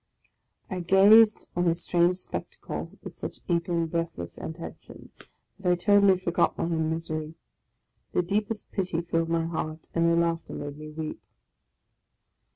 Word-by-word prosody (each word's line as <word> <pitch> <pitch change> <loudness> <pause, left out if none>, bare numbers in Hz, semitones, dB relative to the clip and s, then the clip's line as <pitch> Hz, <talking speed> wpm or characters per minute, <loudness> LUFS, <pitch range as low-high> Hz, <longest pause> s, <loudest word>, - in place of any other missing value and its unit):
I 185 - -4
gazed 205 +5 +6
on 175 0 +1
this 170 0 +1
strange 175 +1 +3
spectacle - - -6
with - - -9
such - - -6
eager 170 0 0
and 170 -1 +1
breathless 165 - -3
attention, 160 +1 -9 0.5
that 180 -2 +1
I - - +4
totally 200 +1 +5
forgot 175 -2 +1
my - - -1
own 160 -1 0
misery. 160 -1 -3 0.8
The 180 - +2
deepest 210 +4 -2
pity 180 -4 -1
filled 165 -1 -1
my 165 0 +1
heart, 160 -1 -4
and 170 0 +3
their 170 - +4
laughter 170 -1 0
made 145 0 -5
me 155 0 -8
weep. 155 0 -6
170 Hz, 150 wpm, -27 LUFS, 165-180 Hz, 0.8 s, gazed